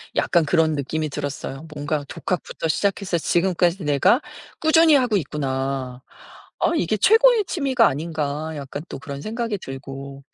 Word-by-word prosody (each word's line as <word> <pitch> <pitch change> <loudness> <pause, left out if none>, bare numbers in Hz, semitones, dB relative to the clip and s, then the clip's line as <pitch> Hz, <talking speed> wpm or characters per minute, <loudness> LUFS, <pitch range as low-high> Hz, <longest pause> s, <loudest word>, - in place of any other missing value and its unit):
약간 170 -3 +2
그런 160 0 +2
느낌이 155 +2 -2
들었어요. 140 +1 -5
'뭔가 145 0 -2
독학부터 175 -2 -3
시작해서 195 +1 0
지금까지 175 +1 +1
내가 175 - +3 0.4
꾸준히 315 0 +5
하고 245 -6 +3
있구나. 135 -4 -3 0.6
아 - - +2
이게 215 - 0
최고의 450 - +5
취미가 265 - +2
아닌가?' 155 0 -3
약간 145 +1 -6
또 - - -6
그런 140 0 -7
생각이 230 -1 -3
들고. 135 +1 -8
160 Hz, 330 characters per minute, -22 LUFS, 140-205 Hz, 0.6 s, 꾸준히